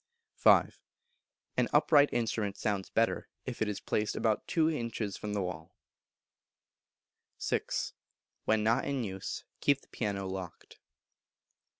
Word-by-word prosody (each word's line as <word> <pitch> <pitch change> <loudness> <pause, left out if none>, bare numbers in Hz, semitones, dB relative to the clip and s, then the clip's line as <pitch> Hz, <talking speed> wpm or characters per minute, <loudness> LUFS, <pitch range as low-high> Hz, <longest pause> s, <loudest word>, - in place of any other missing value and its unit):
v. - - +8 1.1
An - - +3
upright 145 -2 +6
instrument 110 -3 -1
sounds 100 -2 -1
better 115 0 +1 0.2
if 130 -2 -5 0.2
placed 105 -1 0
about 110 -2 0
two 160 -2 +3
inches 115 - -2
from 105 -1 -4
the 100 -2 0
wall. 80 -3 -6 1.6
vi. - - +1 0.8
When 110 -1 +3
not 115 +4 +2
in 140 -3 -1
use 95 -3 -5 0.2
keep 140 -1 +3
the - - -24
piano 100 -3 -2
locked. 95 -2 -7
110 Hz, 115 wpm, -31 LUFS, 100-120 Hz, 1.6 s, v